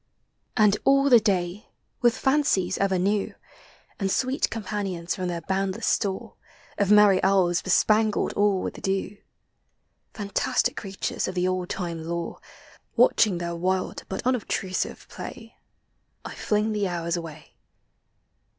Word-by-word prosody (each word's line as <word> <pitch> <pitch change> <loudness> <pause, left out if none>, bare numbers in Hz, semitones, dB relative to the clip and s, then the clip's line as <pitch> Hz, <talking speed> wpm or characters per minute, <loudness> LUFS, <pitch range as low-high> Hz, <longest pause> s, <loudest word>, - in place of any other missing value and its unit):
And 210 -2 +5
all 275 0 +4
the 240 - +9
day, 190 -2 -1 0.3
with 240 -1 +3
fancies 265 -10 +1
ever 195 -1 +2
new, 200 +3 0 0.6
And 195 -2 0
sweet 255 +7 0
companions 195 -5 -3
from 185 -1 -3
their 170 -1 -3
boundless 190 +5 -2
store, 195 -3 -1 0.4
Of 200 -1 +2
merry 210 -2 +6
elves 185 -3 +3
bespangled 215 +3 +2
all 205 -2 +2
with - - -5
dew, 195 +1 -2 1.0
Fantastic 200 -2 0
creatures 195 -2 -3
of 185 - -5
the 180 0 +1
old 185 -1 -2
time 170 -3 -4
lore, 170 +1 -4 0.6
Watching 205 -5 +4
their 170 0 -3
wild 185 +2 -1
but 190 - -5
unobtrusive 215 -6 -2
play, 225 -1 -9 0.7
I - - -6 0.2
liing 210 +1 +2
the 205 -2 0
hours 170 -1 -2
uway. 160 -3 -8
195 Hz, 130 wpm, -25 LUFS, 180-210 Hz, 1.0 s, the